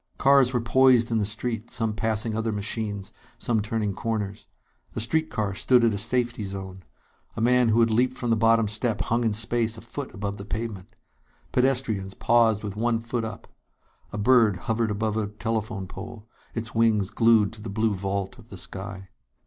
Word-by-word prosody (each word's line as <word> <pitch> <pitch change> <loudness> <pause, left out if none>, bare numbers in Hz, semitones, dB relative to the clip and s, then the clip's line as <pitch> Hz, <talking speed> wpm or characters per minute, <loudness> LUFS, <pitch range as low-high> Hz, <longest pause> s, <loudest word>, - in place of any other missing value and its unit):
Cars 135 -2 +5
were 125 - +1
poised 120 0 +4
in 115 - +2
the 105 - 0
street, 115 +1 -3
some 115 -3 -1
passing 110 0 0
other 110 0 -1
machines, 105 -1 -3 0.2
some 115 -3 0
turning 105 -1 -2
corners. 105 -1 -3 0.5
A - - -1
street 160 +8 0
car 105 -6 -2
stood 125 +5 +3
at 115 -2 +3
a - - -2
safety 120 +1 -1
zone; 95 -1 -7 0.6
a - - -2
man 125 +1 +4
who 115 +2 +4
had 115 -1 +3
leaped 125 +3 +2
from 120 -2 -1
the - - +5
bottom 115 0 +4
step 110 +1 -1
hung 120 +3 0
in 110 -2 +1
space 115 +1 0
a - - -9
foot 130 +4 -6
above 100 +1 -4
the 100 - -6
pavement. 105 0 -5 0.6
Pedestrians 125 -7 0
paused 115 -3 +3
with 100 -1 -5
one 115 +1 +1
foot 115 0 -3
up. 110 - -7 0.6
A - - -5
bird 110 -1 +4
hovered 115 0 0
above 105 +1 -1
a 110 -2 0
telephone 110 -1 -3
pole, 110 +3 -9 0.3
its 115 0 -3
wings 110 -3 +2
glued 110 -2 +4
to 110 - -11
the 110 - -6
blue 110 +2 +1
vault 95 0 -3
of - - -16
the - - -9
sky. 95 -1 -7
110 Hz, 190 wpm, -25 LUFS, 105-120 Hz, 0.6 s, Cars